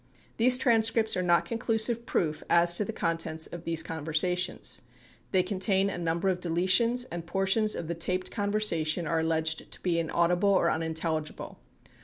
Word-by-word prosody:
These, 250 Hz, +2 st, +4 dB
transcripts 225 Hz, -3 st, +2 dB
are 185 Hz, -, 0 dB
not 175 Hz, -1 st, +2 dB
conclusive 230 Hz, 0 st, 0 dB
proof 155 Hz, -3 st, -1 dB
as 170 Hz, 0 st, +4 dB
to 190 Hz, -, +2 dB
the 225 Hz, -, -4 dB
contents 165 Hz, -4 st, -2 dB
of 170 Hz, -1 st, -7 dB
these 165 Hz, -1 st, +1 dB
conversations. 165 Hz, +3 st, -1 dB, 0.5 s
They 185 Hz, -2 st, +3 dB
contain 195 Hz, +1 st, +1 dB
a -, -, -5 dB
number 170 Hz, +3 st, 0 dB
of 180 Hz, -1 st, -1 dB
deletions 185 Hz, +8 st, +2 dB
and 175 Hz, -1 st, -5 dB
portions 195 Hz, +4 st, +1 dB
of 165 Hz, -, -5 dB
the 170 Hz, -, -2 dB
taped 180 Hz, +2 st, -2 dB
conversation 200 Hz, -6 st, 0 dB
are 165 Hz, +1 st, 0 dB
alleged 160 Hz, -1 st, -1 dB
to -, -, -9 dB
be 170 Hz, -2 st, 0 dB
inaudible 170 Hz, +4 st, +1 dB
or 195 Hz, -, +3 dB
unintelligible. 160 Hz, -1 st, -4 dB
180 Hz, 160 wpm, -28 LUFS, 165-205 Hz, 0.5 s, These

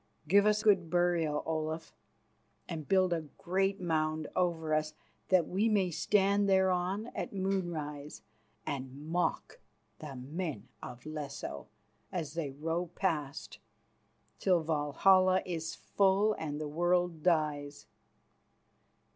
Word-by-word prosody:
Give 200 Hz, +5 st, +5 dB
us 210 Hz, 0 st, +2 dB
good 190 Hz, -6 st, +4 dB
burial, 175 Hz, -4 st, +1 dB
Olaf, 160 Hz, 0 st, -3 dB, 0.7 s
and 155 Hz, -4 st, -5 dB
build 185 Hz, 0 st, +3 dB
a 165 Hz, -, -1 dB, 0.2 s
great 195 Hz, +2 st, 0 dB
mound 155 Hz, -3 st, 0 dB
over 165 Hz, -3 st, 0 dB
us, 155 Hz, 0 st, 0 dB, 0.3 s
that 185 Hz, -3 st, +4 dB
we 205 Hz, +5 st, +1 dB
may 195 Hz, -4 st, +2 dB
stand 200 Hz, +3 st, +2 dB
thereon 190 Hz, +3 st, +1 dB
at -, -, -4 dB
moonrise 170 Hz, -7 st, -3 dB, 0.4 s
and 135 Hz, -3 st, -4 dB
mock 175 Hz, -, -2 dB, 0.4 s
the 150 Hz, -3 st, -7 dB
men 135 Hz, -, -5 dB
of 125 Hz, +2 st, -9 dB
Lesso 150 Hz, -2 st, -6 dB, 0.4 s
as 165 Hz, -6 st, -3 dB
they 165 Hz, -4 st, -2 dB
row 165 Hz, +5 st, -2 dB
past, 155 Hz, -5 st, -2 dB, 0.8 s
till 180 Hz, -4 st, +3 dB
Valhalla 185 Hz, +5 st, +3 dB
is 165 Hz, -3 st, -4 dB
full 200 Hz, +2 st, +2 dB
and 150 Hz, -6 st, -4 dB
the 155 Hz, -, -3 dB
world 175 Hz, +1 st, +1 dB
dies. 150 Hz, -4 st, 0 dB
170 Hz, 115 wpm, -32 LUFS, 155-185 Hz, 0.8 s, Give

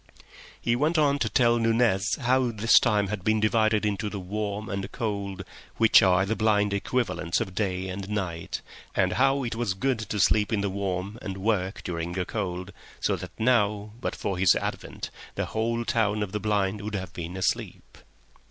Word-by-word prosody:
He 120 Hz, -, +1 dB
went 155 Hz, +6 st, +1 dB
on 145 Hz, -2 st, +3 dB
to 110 Hz, -, 0 dB
tell 120 Hz, 0 st, +3 dB
Nunez 115 Hz, -3 st, +2 dB
how 130 Hz, 0 st, +2 dB
this 115 Hz, 0 st, +5 dB
time 105 Hz, -5 st, +1 dB
had 105 Hz, -3 st, -4 dB
been 110 Hz, +1 st, +2 dB
divided 110 Hz, 0 st, +2 dB
into 105 Hz, +1 st, -1 dB
the 100 Hz, -, -5 dB
warm 105 Hz, +2 st, -4 dB
and 100 Hz, -1 st, -3 dB
the -, -, -4 dB
cold, 100 Hz, -4 st, -4 dB, 0.3 s
which 115 Hz, -1 st, +7 dB
are 95 Hz, 0 st, +4 dB
the 110 Hz, +3 st, -1 dB
blind 105 Hz, -2 st, +2 dB
equivalents 100 Hz, -5 st, -1 dB
of 95 Hz, -, -3 dB
day 95 Hz, -2 st, -1 dB
and 95 Hz, +1 st, -5 dB
night, 90 Hz, -6 st, -3 dB, 0.3 s
and 95 Hz, -1 st, +2 dB
how 135 Hz, +4 st, +2 dB
it 120 Hz, -, -2 dB
was 115 Hz, -4 st, -1 dB
good 130 Hz, +3 st, 0 dB
to 105 Hz, -1 st, -3 dB
sleep 105 Hz, +1 st, +3 dB
in 105 Hz, -3 st, +1 dB
the 100 Hz, -1 st, -1 dB
warm 100 Hz, +2 st, -3 dB
and 95 Hz, -3 st, -5 dB
work 95 Hz, -1 st, -1 dB
during 85 Hz, 0 st, -3 dB
the 90 Hz, 0 st, -1 dB
cold, 95 Hz, -3 st, -4 dB, 0.3 s
so -, -, +1 dB
that -, -, -7 dB
now, 105 Hz, -3 st, +2 dB
but -, -, -2 dB
for 95 Hz, -2 st, -3 dB
his 95 Hz, -1 st, +5 dB
advent, -, -, -4 dB, 0.2 s
the -, -, -1 dB
whole 115 Hz, +1 st, -1 dB
town 105 Hz, -2 st, +1 dB
of 100 Hz, -, -5 dB
the 105 Hz, -, -2 dB
blind 105 Hz, -1 st, 0 dB
would 105 Hz, 0 st, -4 dB
have 95 Hz, -1 st, -5 dB
been 85 Hz, +2 st, -6 dB
asleep. 95 Hz, -1 st, -3 dB
105 Hz, 190 wpm, -26 LUFS, 95-115 Hz, 0.3 s, which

